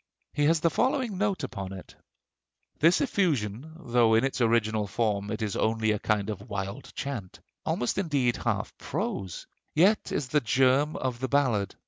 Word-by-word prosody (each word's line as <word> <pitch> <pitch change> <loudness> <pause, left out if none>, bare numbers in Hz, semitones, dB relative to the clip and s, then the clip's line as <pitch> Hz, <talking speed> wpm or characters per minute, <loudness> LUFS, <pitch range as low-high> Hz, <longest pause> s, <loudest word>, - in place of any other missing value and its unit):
He 145 - +1
has 160 +1 +3
the 165 - +3
following 255 -7 0
note 200 -6 0
upon 100 -8 -5
it: 95 - -10 0.9
"This 165 +3 +4
effusion, 155 - 0
although 120 -6 +3
in 115 - +4
its 135 -1 -1
original 110 -2 +2
form 100 -1 -1
it 110 0 -3
is 105 -3 -2
only 110 0 +1
a 105 - 0
kind 105 0 0
of 100 +2 -8
wild 100 +5 -5
chant, 120 -10 -5 0.3
almost 125 +9 0
indeed 140 -9 +1
half - - -2
prose, 95 -3 -4 0.3
yet 190 +7 +3
is 135 -3 -2
the 150 +2 +2
germ 130 +5 +3
of 125 -2 -3
the 130 - -1
ballad. 120 -9 +1
120 Hz, 165 wpm, -28 LUFS, 105-150 Hz, 0.9 s, This